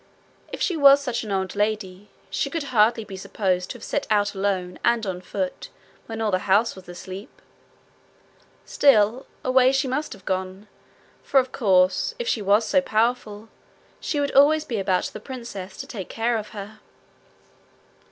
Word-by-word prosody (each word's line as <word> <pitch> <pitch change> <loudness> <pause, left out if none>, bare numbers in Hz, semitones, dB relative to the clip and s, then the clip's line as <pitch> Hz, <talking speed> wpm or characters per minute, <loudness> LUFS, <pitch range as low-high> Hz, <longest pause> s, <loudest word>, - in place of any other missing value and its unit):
If - - -3
she 360 - 0
was 280 -2 +7
such 250 -5 -3
an 215 - -6
old 190 -1 -2
lady, 205 -2 -2 0.2
she 195 +8 -1
could 325 +1 -3
hardly 225 +1 +4
be 200 -2 -9
supposed 190 -2 -2
to - - -6
have - - -15
set 290 - -2
out 205 -1 +2
alone 190 -2 -2
and 235 -2 +2
on 185 -2 -4
foot 185 0 -4 0.4
when 225 0 -5
all 215 -2 0
the 185 - +2
house 215 +4 +3
was 185 -2 -13
asleep. 185 +3 -8 1.4
Still, 240 -2 +3 0.2
away 255 0 +4
she 270 0 0
must 280 +4 -2
have 195 -2 -16
gone, 190 +2 -3 0.5
for, 275 - +3
of 260 0 -2
course, 185 -5 +2
if 480 - -4
she 225 - 0
was 205 +3 +3
so 280 - +3
powerful, 220 -3 -1 0.5
she 295 - -2
would 285 -1 0
always 300 +3 +5
be 230 -4 -3
about 185 -1 +1
the - - -6
princess 215 -6 -8
to - - -6
take 195 -6 -7
care 235 +1 0
of 215 -1 -6
her. 210 +1 -9
215 Hz, 170 wpm, -24 LUFS, 190-250 Hz, 1.4 s, was